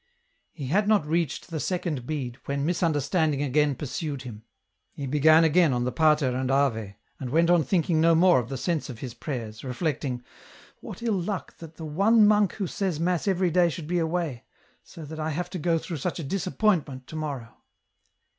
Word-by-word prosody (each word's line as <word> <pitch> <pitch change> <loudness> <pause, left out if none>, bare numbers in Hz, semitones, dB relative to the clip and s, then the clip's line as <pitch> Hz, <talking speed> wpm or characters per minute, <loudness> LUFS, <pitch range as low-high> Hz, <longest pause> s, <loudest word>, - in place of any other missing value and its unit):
He 145 - -7
had 200 +10 +1
not 210 -7 +3
reached 160 0 -1
the 160 - -3
second 160 -8 -2
bead, 130 -5 -4
when 140 0 -2
misunder 165 -4 +1
standing 155 -5 +1
again 145 +1 +2
pursued 145 0 -4
him. 110 -4 -9 0.5
He 140 - -5
began 155 +4 +5
again 160 -2 +4
on 120 0 0
the 125 - -1
Patei 150 -1 +3
and 130 0 -2
Ave, 115 -8 0 0.2
and 130 - -5
went 165 +5 +3
on 175 -2 +4
thinking 165 -1 +1
no 165 0 +5
more 175 -3 +5
of 120 -1 -5
the 135 - -4
sense 165 -2 -2
of 125 - -7
his 125 0 -7
prayers, 115 -5 -6
reflecting: 135 -2 -3 0.3
" - - -23
What - - -9
ill 215 -6 0
luck 190 +1 -4
that 165 -1 -11
the 160 - -7
one 205 +8 +4
monk 210 -2 +4
who 200 - -3
says 185 -3 -2
mass 175 +2 0
every 185 -2 +2
day 175 0 +4
should 165 -1 -6
be 175 +1 0
away, 160 -6 -2 0.4
so 160 - -11
that 160 +2 -8
I 155 0 -1
have 175 +4 -3
to 180 - -4
go 165 +1 +1
through 165 0 -5
such 170 +5 -3
a 165 - -4
disappointment 175 -5 0
to 155 - -10
morrow 140 -7 -5
155 Hz, 200 wpm, -26 LUFS, 135-175 Hz, 0.5 s, began